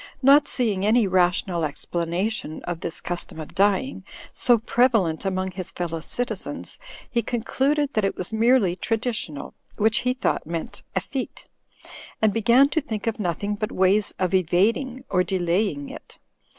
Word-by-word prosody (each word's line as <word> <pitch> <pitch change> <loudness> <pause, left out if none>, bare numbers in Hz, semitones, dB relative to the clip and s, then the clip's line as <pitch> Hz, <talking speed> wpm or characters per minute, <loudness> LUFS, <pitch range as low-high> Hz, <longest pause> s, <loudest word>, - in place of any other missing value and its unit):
Not 280 +2 +6
seeing 210 -7 +1
any 220 +2 +4
rational 180 -2 +1
explanation 170 +4 -2
of 175 -2 -4
this 165 - -4
custom 175 -2 -5
of 155 - -8
dying, 200 +2 +1 0.3
so 240 -1 +4
prevalent 225 -8 +2
among 190 0 -1
his 185 -1 -5
fellow 165 -2 -3
citizens, 245 +10 -4 0.3
he 235 - 0
concluded 270 +5 0
that 215 - +1
it 195 - 0
was 185 +4 -4
merely 220 -5 +3
traditional 220 - -2 0.2
(which 220 +1 +3
he 250 +1 0
thought 255 - -1
meant 165 0 -5
"effete"), 270 -2 -4 0.7
and 215 -2 +3
began 235 +5 +5
to 315 - 0
think 220 -7 -5
of 225 -1 -1
nothing 200 +2 -1
but 210 +1 -3
ways 195 +3 +3
of 185 0 -1
evading 215 - +1
or 180 -1 +3
delaying 175 -5 0
it. - - -11
205 Hz, 150 wpm, -24 LUFS, 175-235 Hz, 0.7 s, Not